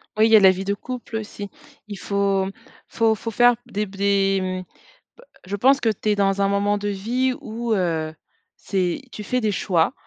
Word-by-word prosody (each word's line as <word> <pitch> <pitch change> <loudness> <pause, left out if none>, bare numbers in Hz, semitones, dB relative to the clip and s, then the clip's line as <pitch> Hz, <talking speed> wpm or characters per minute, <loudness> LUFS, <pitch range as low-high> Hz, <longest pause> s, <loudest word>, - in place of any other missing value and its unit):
Oui 215 - +4
il - - 0
y - - +8
a - - +9
la 190 -1 +7
vie 190 +1 -4
de 200 - 0
couple 240 0 -6
aussi. 205 -2 -7 0.4
Il 205 - -7
faut 200 -1 0 0.4
faut 225 -1 +2
faut 225 +1 -5
faire 240 +2 +5
des 210 -2 -2
b 195 0 -13
des, 195 -1 +2
mmh, 185 0 -3 0.5
bah, - - -16 0.2
je 200 +2 -3
pense 270 +6 +4
que 230 - +2
tu 215 0 -2
es 210 - +3
dans 200 0 +1
un 195 - +3
moment 200 +1 +1
de 205 0 -4
vie 240 +6 0
où, 230 +1 -3
heu, 165 -5 -1 0.4
c'est, 185 +1 -1
tu 210 - -7
fais 250 +4 -1
des 215 -1 +1
choix, 170 -4 +1
205 Hz, 215 wpm, -22 LUFS, 195-225 Hz, 0.5 s, a